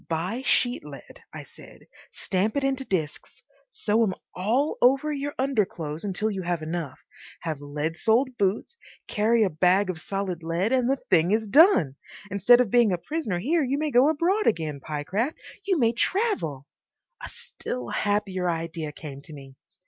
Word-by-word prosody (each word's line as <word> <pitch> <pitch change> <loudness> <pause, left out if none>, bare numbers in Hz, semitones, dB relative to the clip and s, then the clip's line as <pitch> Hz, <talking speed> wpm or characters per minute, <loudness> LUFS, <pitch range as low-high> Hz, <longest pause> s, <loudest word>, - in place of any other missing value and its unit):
"Buy 180 +9 -2
sheet 245 -2 +1
lead," 145 -2 -12
I - - -8
said, - - -15 0.2
"stamp 200 +6 -1
it 280 - 0
into 270 0 0
discs. 165 - -4 0.3
Sew 215 +2 0
'em 190 -4 0 0.2
all 235 +11 0
over 275 +4 +3
your 290 0 -4
underclothes 190 - -1
until 205 +2 -1
you 195 -2 -4
have 175 -2 -2
enough. 160 -4 -4 0.4
Have 155 -4 -4
lead 150 +3 -4
soled 245 +4 +2
boots, 205 - -1 0.3
carry 220 +2 +2
a 200 - +2
bag 185 +4 +3
of 160 -3 -9
solid 195 -3 -3
lead, 170 +6 -1
and 255 -1 +2
the 270 - +2
thing 170 -1 +4
is 220 +2 +1
done! 205 - +5 0.3
Instead 240 +6 +5
of 230 -6 -1
being 240 -4 +4
a 180 - +1
prisoner 260 - -3
here 300 - +1
you 270 +1 -1
may 305 0 -1
go 255 +4 +5
abroad 355 +7 +1
again, 155 -8 0
Pyecraft; 180 - -2 0.3
you 380 -3 +2
may 230 -5 +3
travel—" 245 - -1 0.6
A - - -6
still 125 -1 -6
happier 200 -3 -1
idea 165 -2 -3
came 145 -2 -9
to 155 - -13
me. 135 -2 -11
200 Hz, 170 wpm, -25 LUFS, 165-255 Hz, 0.6 s, done